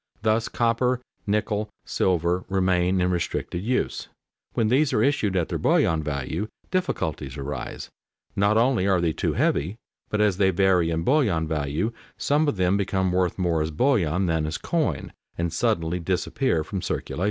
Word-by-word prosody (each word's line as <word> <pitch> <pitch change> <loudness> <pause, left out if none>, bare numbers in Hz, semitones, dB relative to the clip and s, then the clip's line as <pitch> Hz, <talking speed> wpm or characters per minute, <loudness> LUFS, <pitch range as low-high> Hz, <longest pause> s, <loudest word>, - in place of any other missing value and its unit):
Thus 110 +1 +2
copper, 120 +2 +1 0.3
nickel, 105 0 0 0.2
silver 90 0 +1
remain 95 -1 +2
in 90 0 +2
restricted 85 0 -2
use. 125 +5 -1 0.5
When 110 - +1
these 135 +3 +3
are 105 - +3
issued 110 -9 +1
at 85 -3 0
their - - -2
bullion 80 -1 +3
value, 75 +6 -3 0.2
difficulties 80 - -2
arise; 70 -3 -5 0.4
not 100 +2 +3
only 115 -4 +3
are 95 -2 +3
they 85 -2 +1
too - - -1
heavy, 85 +9 +1 0.3
but 105 - -1
as 105 -3 +3
they 95 -1 +4
vary 95 -2 +3
in 80 0 -1
bullion 105 - +2
value, 75 +8 -1 0.2
some 150 +2 +2
of 130 - 0
them 90 +1 +2
become 95 -2 0
worth 90 -1 +1
more 85 -4 +1
as 80 - -1
bullion 95 - +1
than 80 -3 0
as 80 - -2
coin, 150 - -1 0.2
and 85 0 -1
suddenly 90 -5 0
disappear 90 - 0
from 95 +3 -4
circulation. - - -3
95 Hz, 165 wpm, -25 LUFS, 80-110 Hz, 0.5 s, they